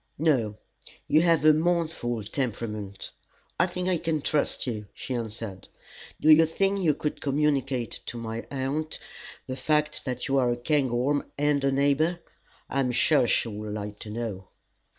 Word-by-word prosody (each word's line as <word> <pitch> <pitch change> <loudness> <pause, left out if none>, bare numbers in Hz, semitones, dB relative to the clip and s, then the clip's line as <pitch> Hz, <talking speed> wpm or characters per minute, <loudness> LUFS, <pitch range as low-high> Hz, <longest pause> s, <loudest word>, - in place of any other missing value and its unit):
"No; 130 -9 +2 0.5
you 155 - +5
have 165 -3 +3
a 155 - +8
mournful 155 -8 0
temperament. 105 -4 -4 0.5
I - - +4
think 180 0 -3
I 185 -2 +2
can 155 -3 -1
trust 150 -2 0
you," 105 -5 -4
she 130 - -5
answered. 110 -4 -5 0.5
"Do 155 - +5
you 160 +1 +7
think 195 +4 +1
you 160 -6 +2
could 150 - -3
communicate 135 -4 0
to 120 - -4
my 115 0 -5
aunt 140 +3 -2 0.5
the 130 - -4
fact 150 +3 0
that 125 -2 -3
you 135 0 +2
are 125 -2 +2
a 120 - -1
Cairngorm 135 +1 +1
and 145 -1 +2
a 135 - +3
neighbor? 145 +5 +2 0.5
I 140 - -1
am 130 -2 +1
sure 125 +1 +4
she - - +2
would 105 0 -5
like 105 0 -6
to 105 - -7
know." 105 -4 -5
135 Hz, 165 wpm, -27 LUFS, 115-155 Hz, 0.5 s, a